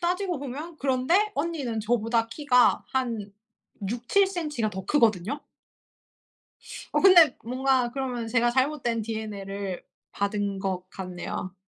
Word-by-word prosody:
따지고 360 Hz, -1 st, -1 dB
보면 290 Hz, +5 st, -7 dB
그런데 285 Hz, +11 st, +2 dB
언니는 285 Hz, -8 st, -2 dB
저보다 230 Hz, +1 st, +1 dB
키가 250 Hz, -2 st, +3 dB
한 230 Hz, -6 st, -2 dB, 0.6 s
6-7cm 305 Hz, -, 0 dB
가 215 Hz, -, +1 dB
더 190 Hz, -1 st, -6 dB
크거든요. 230 Hz, -1 st, +2 dB, 1.5 s
어 -, -, +2 dB
근데 345 Hz, -7 st, +7 dB
뭔가 255 Hz, 0 st, +1 dB
그러면 255 Hz, -4 st, -3 dB
제가 240 Hz, +1 st, +2 dB
잘못된 260 Hz, -3 st, 0 dB
DNA를 200 Hz, -3 st, -5 dB, 0.3 s
받은 200 Hz, -1 st, -1 dB
것 190 Hz, -2 st, -3 dB
같네요. 185 Hz, 0 st, -6 dB
245 Hz, 245 characters per minute, -26 LUFS, 210-290 Hz, 1.5 s, 근데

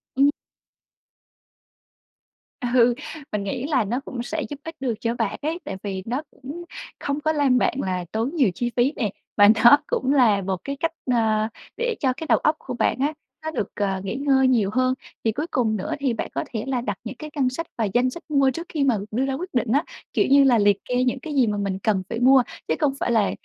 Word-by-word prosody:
Ừm. 275 Hz, +2 st, +5 dB, 2.4 s
Ừ, 245 Hz, -1 st, +5 dB, 0.4 s
mình 210 Hz, -1 st, -1 dB
nghĩ 245 Hz, +6 st, -3 dB
là 275 Hz, -6 st, +2 dB
nó 230 Hz, +5 st, -1 dB
cũng 240 Hz, -2 st, -5 dB
sẽ 315 Hz, +6 st, -3 dB
giúp 290 Hz, -2 st, -7 dB
ích 325 Hz, 0 st, -7 dB
được 260 Hz, -3 st, -1 dB
cho 230 Hz, 0 st, 0 dB
bạn -, -, -2 dB
ấy, 320 Hz, +4 st, -2 dB
tại 195 Hz, -, -4 dB
vì 190 Hz, -2 st, -4 dB
nó 250 Hz, +5 st, -2 dB
cũng 285 Hz, +6 st, -8 dB, 0.4 s
không 285 Hz, +1 st, -2 dB
có 315 Hz, -, +2 dB
làm 285 Hz, -5 st, +3 dB
bạn -, -, +2 dB
là 185 Hz, -2 st, -2 dB
tốn 225 Hz, +5 st, -1 dB
nhiều 270 Hz, -10 st, +4 dB
chi 240 Hz, 0 st, -2 dB
phí 250 Hz, +4 st, +3 dB
nè, 220 Hz, -5 st, 0 dB, 0.3 s
và 205 Hz, -, +8 dB, 0.2 s
nó 240 Hz, +5 st, +9 dB
cũng 265 Hz, +2 st, 0 dB
là 225 Hz, -8 st, +4 dB
một 190 Hz, 0 st, -2 dB
cái 280 Hz, -, -3 dB
cách, 330 Hz, +1 st, 0 dB, 0.2 s
ờ, 220 Hz, -2 st, +2 dB, 0.3 s
để 480 Hz, -1 st, 0 dB
cho 260 Hz, -3 st, +2 dB
cái 320 Hz, -, -6 dB
đầu -, -, +5 dB
óc 310 Hz, -, +2 dB
của 255 Hz, -, -6 dB
bạn 245 Hz, -, +1 dB
á 290 Hz, +3 st, +1 dB, 0.3 s
nó 315 Hz, -, -2 dB
được, 210 Hz, -10 st, -2 dB
ờ, 195 Hz, -2 st, -1 dB
nghỉ 195 Hz, -, -3 dB
ngơi 270 Hz, -1 st, +3 dB
nhiều 230 Hz, -6 st, +3 dB
hơn. 255 Hz, 0 st, +2 dB, 0.3 s
Thì 225 Hz, -, +2 dB
cuối 295 Hz, +9 st, -3 dB
cùng 225 Hz, -4 st, +1 dB
nữa 185 Hz, -, -3 dB
thì 270 Hz, -4 st, +1 dB
bạn 225 Hz, -, -4 dB
có -, -, -1 dB
thể 220 Hz, -2 st, -2 dB
là 260 Hz, -2 st, 0 dB
đặt 245 Hz, -, -3 dB
những 240 Hz, +2 st, -6 dB
cái 305 Hz, -, -7 dB
ngân 265 Hz, -3 st, +2 dB
sách 295 Hz, +6 st, -4 dB
và 225 Hz, -, +1 dB
danh 245 Hz, +1 st, +3 dB
sách 335 Hz, +7 st, -9 dB
mua 275 Hz, -3 st, +3 dB
trước 335 Hz, +6 st, -6 dB
khi 300 Hz, -4 st, 0 dB
mà 255 Hz, -5 st, +3 dB
đưa 250 Hz, +5 st, 0 dB
ra 270 Hz, -, -1 dB
quyết 350 Hz, +7 st, -4 dB
định 245 Hz, -3 st, 0 dB
á, 285 Hz, +5 st, +3 dB, 0.3 s
kiểu, -, -, +3 dB
như 280 Hz, +1 st, +7 dB
là 255 Hz, -3 st, +5 dB
liệt 205 Hz, -2 st, +4 dB
kê 250 Hz, 0 st, +1 dB
những 255 Hz, +1 st, 0 dB
cái 300 Hz, +2 st, -6 dB
gì 260 Hz, -4 st, +4 dB
mà 210 Hz, -1 st, -1 dB
mình 195 Hz, -2 st, -2 dB
cần 195 Hz, -2 st, +1 dB
phải 230 Hz, -, -3 dB
mua 260 Hz, +1 st, +6 dB, 0.2 s
chứ -, -, +2 dB
không 295 Hz, -4 st, +2 dB
phải -, -, 0 dB
là, 220 Hz, -4 st, +3 dB
255 Hz, 240 wpm, -23 LUFS, 220-280 Hz, 2.4 s, nó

